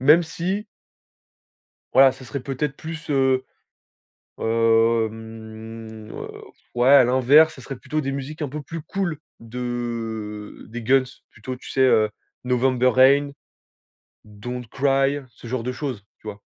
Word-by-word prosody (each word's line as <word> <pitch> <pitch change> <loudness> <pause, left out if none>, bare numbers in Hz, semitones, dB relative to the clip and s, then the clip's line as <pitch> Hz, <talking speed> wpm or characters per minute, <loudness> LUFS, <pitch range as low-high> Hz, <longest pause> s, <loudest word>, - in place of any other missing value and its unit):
même 150 +6 +6
si 180 +5 -3 1.3
voilà, 135 0 +7
ça 130 0 -13
serait 125 +3 -5
peut-être 135 +2 -3
plus, 160 -1 -7
heu, 130 -2 +2 0.9
hem, 115 -1 -1
heu, - - -6
pff, - - -13
ouais 120 +2 +3
à 140 -2 +9
l'inverse, 130 +6 +5
ça 130 - -11
serait 135 - -6
plutôt 155 +4 -3
des 135 -1 -2
musiques 140 +3 -5
un 145 - -3
peu 150 +2 -5
plus 165 +2 -7
cool 170 -2 -2 0.2
de 115 -3 -5
des 115 +1 -6
Guns, 130 +3 +4 0.3
plutôt 125 +4 -7
tu 125 - -12
sais, 135 - +1
heu, 110 -5 +5 0.3
November 125 0 +2
Rain, 140 +3 +5 0.9
Don't 120 +4 -7
Cry, 135 +2 +2
ce 120 - -15
genre 120 0 -2
de 125 +2 -3
choses, 125 -7 -5
tu - - -18
vois? 100 -1 -6
130 Hz, 145 wpm, -23 LUFS, 115-140 Hz, 1.3 s, à